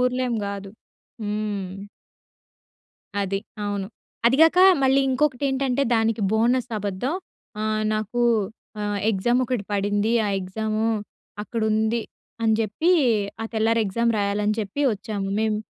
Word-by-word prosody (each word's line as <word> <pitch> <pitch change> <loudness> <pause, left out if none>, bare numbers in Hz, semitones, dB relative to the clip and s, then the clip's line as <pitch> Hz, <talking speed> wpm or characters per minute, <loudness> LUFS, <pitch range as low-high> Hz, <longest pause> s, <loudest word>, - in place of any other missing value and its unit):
ఊర్లేం 250 -1 +1
గాదు. 200 -1 -5 0.5
హ్మ్. 205 -2 -3 1.5
అది. 195 0 -1 0.3
అవును. 200 -1 -2 0.4
అది 245 +3 +4
గాక, 325 +2 +5 0.2
మళ్ళీ 265 +1 +4
ఇంకొకటెంటంటే, 270 -1 +1
దానికి 225 -1 +1
బోనస్ 240 +3 +2
అబద్ధం. 205 - -2 0.5
ఆహ్, 215 0 0
"నాకూ 215 +3 -1 0.6
ఆహ్, 205 0 -1
ఎగ్జామొకటి 240 +2 0
పడింది. 205 +2 +1
ఆ - - 0
ఎగ్జాము 215 +4 -2 0.6
అక్కడుంది" 220 0 0 0.4
అని 220 -1 +3
జెప్పి, 225 - +1 0.5
ఆ - - -3
తెల్లారి 225 +1 +2
ఎగ్జామ్ 230 +4 +1
రాయాలని 205 +1 +1
చెప్పి 210 +8 -4
వచ్చాము. 205 -1 -4
మేము 220 -1 +1
220 Hz, 110 wpm, -24 LUFS, 205-245 Hz, 1.5 s, గాక